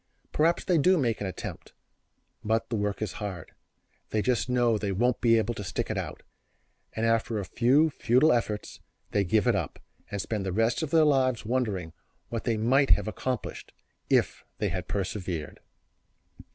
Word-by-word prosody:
Perhaps 165 +3 +2
they 175 -4 +2
do 185 +5 +4
make 120 -8 0
an 100 - -1
attempt, 95 - -7 0.7
but 110 +2 0
the - - +1
work 105 0 -1
is 105 - -3
hard, 95 -6 -5 0.6
they 105 -1 0
just 125 -1 0
know 120 -2 +3
that 110 - -1
they 100 -2 -1
won't 120 +5 +1
be 115 -2 +5
able 110 +1 0
to 105 - -6
stick 90 - -3
it - - -2
out, - - -5 0.7
and 110 - -1
after 115 0 +1
a 100 - -3
few 135 +10 +3
futile 130 +5 +3
efforts 110 -3 -2 0.3
they 100 - +2
give 105 +2 +2
it - - +3
up, - - -3 0.3
and 100 - -4
spend 105 +1 -2
the 95 - -2
rest 115 - +1
of 160 - -2
their 160 0 +5
lives 130 -6 +2
wondering 105 -9 -1 0.4
what 115 -1 -4
they 115 -2 +1
might 130 +5 +3
have - - +4
accomplished 125 +3 -4 0.4
if - - +2
they - - 0
had - - -4
persevered. 90 -5 -4
115 Hz, 180 wpm, -28 LUFS, 105-125 Hz, 0.7 s, be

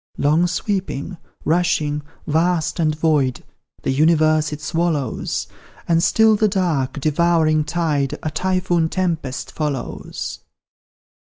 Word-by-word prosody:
Long 155 +5 +3
sweeping, 185 -2 -3 0.3
rushing, 155 -3 +1 0.2
vast 165 +2 +1
and 155 -2 +2
void, 150 -6 +1 0.4
The - - 0
universe 155 +1 +3
it 150 - -5
swallows; 155 -5 -1 0.4
And 165 -1 +3
still 220 +4 +4
the 215 +1 +3
dark, 160 -8 0
devouring 155 +1 +2
tide 150 -5 -1
A 155 - -2
typhoon 175 -1 0
tempest 165 -8 -2
follows. 145 -5 -4
160 Hz, 105 wpm, -20 LUFS, 150-175 Hz, 0.4 s, still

